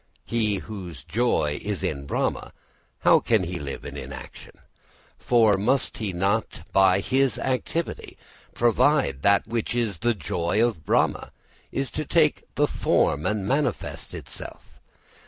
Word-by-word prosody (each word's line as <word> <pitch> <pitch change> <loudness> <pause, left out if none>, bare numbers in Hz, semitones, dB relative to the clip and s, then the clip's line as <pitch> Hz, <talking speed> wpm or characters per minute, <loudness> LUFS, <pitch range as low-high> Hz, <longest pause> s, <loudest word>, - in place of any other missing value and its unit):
He 110 -3 0
whose 95 - -7
joy 95 -10 0
is - - -3
in 70 0 -3
Brahma, - - -2 0.5
how - - +6
can 110 -5 +2
he 90 0 -4
live 70 -2 -6
in - - -7
inaction? - - -9 0.7
For 110 -4 +4
must 125 +7 +1
he 105 -3 -2
not 95 0 -1
by 95 0 +5
his 135 +4 +1
activity 135 +6 -3 0.4
provide 120 - +2
that 100 +3 +4
in 110 - -17
which 115 0 -1 0.3
the 120 0 +1
joy 85 +2 -1
of 105 -10 -3
Brahma - - +1 0.4
is 135 -1 -2
to 155 - -3
take 155 0 +2 0.2
form 75 - +1
and 105 -2 -1
manifest 140 +4 -2
itself? - - -9
110 Hz, 135 wpm, -25 LUFS, 90-125 Hz, 0.7 s, how